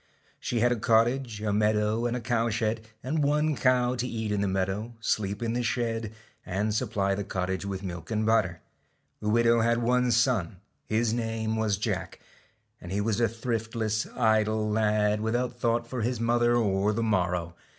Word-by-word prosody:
She - - -4
STALK - - +1
had 120 - +4
a 120 - 0
cottage, 115 0 +2
a 105 -1 0
meadow, 105 +2 +1
and 120 +1 -1
a - - -5
cow 115 -1 0
shed, 110 0 -1 0.2
and 150 +4 0
one 150 +1 +2
cow 125 -2 +2
to 125 0 -2
eat 110 -3 -3
in 105 -1 0
the 100 - +1
meadow, 95 +5 -2
sleep 105 -1 -1
in 115 0 -1
the 120 - 0
shed, 115 -2 -1 0.3
and 100 +4 -1
supply 100 -2 0
the 100 +1 -2
cottage 95 +1 -3
with 95 0 -4
milk 85 -3 -6
and 110 -1 0
butter. 90 -6 +1 0.6
The 105 - -1
widow 115 +1 +4
had 115 +1 +2
one 125 +1 +2
son, 115 -6 +1 0.3
his 110 +1 +1
name 115 -1 -2
was 110 -3 0
Jacjg^. 105 - -3 0.7
and 90 - -8
he 100 - 0
was 105 +1 0
a 115 - +4
thriftless, 115 -1 -2
idle 110 -2 +2
lad, 105 -1 +1
without 120 +2 -1
thought 120 -1 +1
for 125 0 -4
his 120 +2 -1
mother 120 +1 +2
or 105 -2 +2
the 115 +2 -1
morrow. 90 -5 0
110 Hz, 185 wpm, -27 LUFS, 105-120 Hz, 0.7 s, had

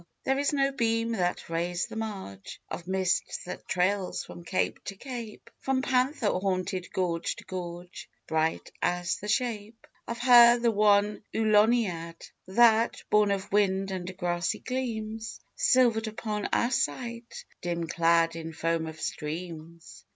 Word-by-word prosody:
There 270 +1 +1
is 285 - +1
no 275 -1 +2
beam 230 -3 0
that 180 -5 -1
rays 175 +1 -1
the - - -10
marge 195 - -6
Of 175 - -6
mist 190 -1 0
that 180 - -8
trails 185 +1 0
from 175 - -10
cape 185 - -1
to 195 - -5
cape, 235 -1 -8
From 265 -1 0
panther 255 -3 +1
haunted 185 -1 -2
gorge 170 -3 -1
to - - -12
gorge, 175 -1 -7 0.2
Bright 160 0 -1
as 175 0 0
the 210 - -8
shape 225 -1 -2 0.2
Of 235 - -4
her, 240 -1 +8
the 235 -1 +2
one 205 0 +3
Auloniad, 210 -6 +2 0.2
That, 230 +3 +4
born 210 -1 +5
of 200 0 -2
wind 195 -1 +2
and 185 0 -5
grassy 175 -1 -1
gleams, 225 -3 -4 0.2
Silvered 245 - +3
upon 215 -1 -3
our 240 - +2
sight, 235 -3 -3 0.2
dim 170 -1 -2
clad 165 0 +2
In 165 0 -6
foam 165 0 -1
of 160 0 -8
streams. 165 +1 -6
200 Hz, 145 wpm, -28 LUFS, 175-230 Hz, 0.2 s, her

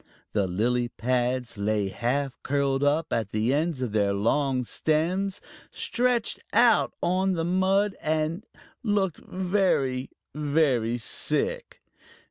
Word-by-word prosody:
The 100 -3 +1
lily 120 +7 0
pads 125 -1 -1
lay 105 -1 0
half 130 +6 -1
curled 140 -1 0
up 150 +3 +1
at 110 -3 -1
the 110 +5 0
ends 150 -2 0
of 120 - -3
their 100 -2 +1
long 130 +6 +1
stems, 175 - 0 0.3
stretched 245 -2 0
out - - +4
on 190 +2 +2
the 165 -2 -1
mud, 190 +3 +2
and 155 +5 -1 0.4
looked 200 -6 0
very, 180 -9 0 0.2
very 140 -6 +1
sick. 475 - -1
145 Hz, 115 wpm, -26 LUFS, 120-180 Hz, 0.4 s, out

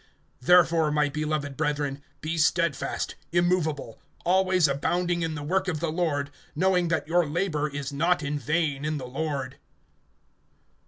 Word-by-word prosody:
(58)Therefore, 165 -1 +5
my 150 -1 +2
beloved 150 -1 -2
brethren, 145 -2 -1 0.2
be 160 +2 -2
steadfast, 165 -2 0 0.2
immovable, 170 -8 0 0.3
always 185 -2 +4
abounding 175 +5 0
in 165 -1 -2
the 145 - -5
work 190 +5 0
of 160 -4 -1
the 165 0 -1
Lord, 150 -4 -1 0.2
knowing 180 +1 +2
that 160 -2 -1
your 175 0 +2
labor 155 -2 -1
is 145 0 -5
not 170 +3 +1
in 145 +1 -2
vain 150 -2 0
in 155 0 -1
the 130 - -6
Lord. 135 -1 -3
155 Hz, 145 wpm, -26 LUFS, 145-175 Hz, 0.3 s, 58)Therefore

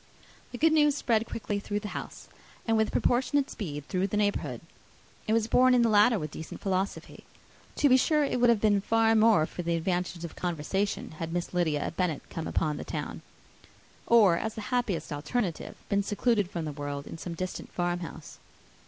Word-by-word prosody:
The 245 - -6
good 315 +4 +4
news 295 -2 +3
quickly 220 -2 0
spread - - -13
through 205 0 -2
the 210 - -5
house; - - -7 0.4
and 225 - +3
with 220 0 +2
proportionate 265 +3 +1
speed 150 -8 -6
through 185 +1 0
the 210 - -2
neighbourhood. 205 -1 -1 0.7
It 215 - +2
was 225 -1 +2
borne 255 +2 +4
in 240 - +4
the 230 - +3
latter 215 +2 +5
with 155 -5 -5
decent 160 - -8
philosophy. 195 0 -3 0.5
To 290 - +3
be 260 -1 +6
sure, 300 +3 +2
it 265 -3 -1
would 245 - +5
have 230 -3 +4
been 205 -2 +3 0.4
more 215 -8 +5
for 175 - -6
the 170 -1 0
advantage 175 0 -2
of 165 - -9
conversation, 180 +4 -2
had 165 0 -4
Miss 175 +1 -3
Lydia 160 -5 0
Bennet 180 -5 -1
come 165 - -4
upon 150 -2 -1
the - - -5
town; - - -5 0.9
or, 210 -7 +6
as 220 +3 -3
the 220 - -5
happiest 210 -10 -1
alternative, 170 +5 -3
been 200 0 +1
secluded 205 -1 +1
from 170 -3 -4
the 155 - -3
world 145 -1 -5
in 165 - -9
some 170 0 -6
distant 185 +2 -5
farm 175 0 -1
house. 160 -3 -9
200 Hz, 190 wpm, -28 LUFS, 170-230 Hz, 0.9 s, be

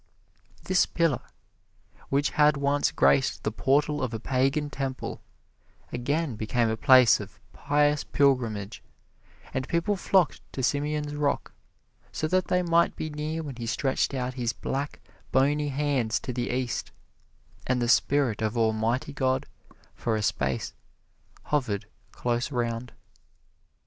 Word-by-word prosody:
This 185 -1 +3
pillar, 165 -6 +1 0.9
which 140 +2 +1
had 150 -1 +4
once 140 +1 +1
graced 70 0 +2
the 110 - -1
portal 145 +6 +1
of 125 -3 -2
a - - -4
pagan 135 +5 0
temple, 135 -1 -4 0.7
again 140 +2 -1
became 115 +2 0
a 110 - 0
place 130 0 +6
of - - -10
pious 145 0 +1
pilgrimage, 115 -7 0 0.7
and 130 0 -2
people 170 +5 +1
flocked 185 -2 +2
to 130 - -3
Simeon's 145 +2 -1
rock, 145 -1 -1 0.6
so 155 - -2
that 185 +1 +1
they 180 0 +2
might 170 0 +3
be 155 - -4
near 155 +2 -3
when 140 -5 -7
he 120 -1 -5
stretched 135 +3 0
out 125 -1 -2
his 120 -2 -2
black, 140 +2 -4 0.3
bony 145 +3 +2
hands 135 -4 0
to 125 - -5
the 120 0 -2
East, 125 -1 -2 0.8
and 125 -1 +1
the 120 - 0
spirit 120 -1 +2
of 110 +2 -1
Almighty 115 +4 0
God, 130 -1 0 0.5
for 115 - -1
a 110 - -1
space, 65 -8 -1 0.7
hovered 125 -9 -1 0.3
close 120 +3 -2
around. 120 -1 -2
130 Hz, 135 wpm, -27 LUFS, 120-150 Hz, 0.9 s, place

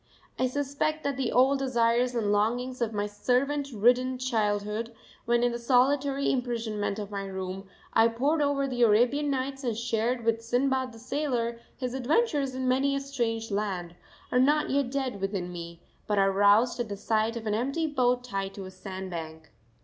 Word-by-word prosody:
I 255 - +3
suspect 285 +3 -2
that 280 -1 -1
the 260 -3 -1
old 265 +2 +4
desires 245 -1 +1
and 210 -3 +1
longings 245 +5 0
of 230 -2 0
my 205 -1 -1
servant 270 +7 0
ridden 250 +3 +3
childhood 220 -2 -1 0.3
when 240 0 +2
in 245 - +3
the 235 - -4
solitary 275 +3 +2
imprisonment 230 -5 -2
of 210 -1 -6
my 200 -1 -3
room 190 0 -6 0.2
I 225 0 +6
pored 275 +7 +1
over 285 -1 +1
the 250 -2 -3
Arabian 240 +6 +4
Nights, 270 0 -2
and 235 -4 -1
shared 235 +1 -1
with 230 0 +1
Sinbad 260 +2 0
the 230 - -13
Sailor 245 -2 -2 0.2
his 250 -2 -3
adventures 275 - +1
in 260 0 -2
many 270 +2 +2
a - - 0
strange 235 -5 -2
land 190 -4 -2 0.4
are 250 - +3
not 295 +4 +3
yet 275 -2 +1
dead 260 -6 -3
within 195 -2 -2
me, 170 -1 -8 0.2
but 210 - 0
are 195 0 +4
roused 205 +6 +4
at 235 -3 -2
the 200 - -4
sight 220 +2 0
of 225 - -7
any 210 -1 0
empty 275 +7 -1
boat 250 -4 +1
tied 195 -5 -4
to 195 - -7
a 185 - -9
sand 190 0 -7
bank. 160 -2 -7
240 Hz, 185 wpm, -28 LUFS, 210-265 Hz, 0.4 s, I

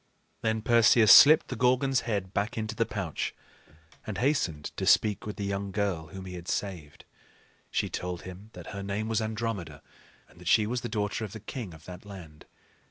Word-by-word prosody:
Then 110 -1 -1
Perseus 115 -2 +5
slipped 155 +3 +8
the 130 - -3
Gorgon's 130 +2 +2
head 100 -3 -2
back 105 +3 -2
into 110 0 -3
the 115 +1 0
pouch 95 -8 -4 0.7
and 110 - -4
hastened 105 - -1
to - - -2
speak 105 -1 +3
with 105 - -5
the 100 - -4
young 100 0 -3
girl 95 -5 -2
whom 95 +4 -9
he 90 - -8
had 90 -1 -9
saved. 85 -7 -4 0.6
She - - -1
told 90 -1 -5
him 95 +4 -10
that 90 -2 -10
her 100 - -6
name 100 +2 -3
was 115 -1 0
Andromeda, 110 -4 -4 0.4
and 85 - -19
that 90 - -10
she 110 +4 +4
was 120 +3 -2
the 120 - -5
daughter 105 0 -2
of 105 - -6
the 110 - -7
king 110 -1 -7
of 80 0 -17
that 90 0 -10
land. 90 -7 -12
105 Hz, 195 wpm, -28 LUFS, 90-110 Hz, 0.7 s, slipped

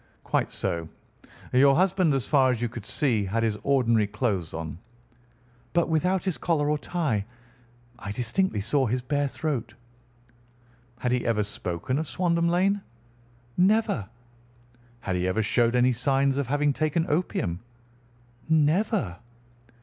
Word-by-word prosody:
"Quite - - 0
so. 85 -1 -2 0.6
Your 135 +2 +6
husband, 185 -3 +3
as 135 - -1
far 135 -3 +4
as 125 -3 0
you 120 - 0
could 115 -2 -9
see, 120 -8 +1
had 115 +4 -1
his 110 -2 +1
ordinary 115 -6 +2
clothes 100 -7 -2
on?" 80 0 -6 0.9
"But 170 -1 +2
without 180 +3 +1
his 180 -9 -2
collar 150 -2 +1
or 150 - 0
tie. 145 - -1 0.8
I 105 - -7
distinctly 120 - 0
saw 130 +5 +1
his 125 +2 -1
bare 145 +2 0
throat." 140 -3 -3 1.3
"Had 125 - 0
he 125 0 +1
ever 110 -2 +2
spoken 100 - -3
of 160 - -3
Swandam 170 +5 +1
Lane?" 195 +4 +2 0.8
"Never." 185 - +2 0.9
"Had 95 -1 -2
he 90 +1 0
ever 110 +4 +1
showed 115 +3 +2
any 125 +1 +4
signs 135 +3 +1
of 140 - -1
having 145 +1 +1
taken 155 +3 0
opium?" 145 - -1 0.9
"Never." 160 - +2
135 Hz, 140 wpm, -26 LUFS, 110-160 Hz, 1.3 s, Your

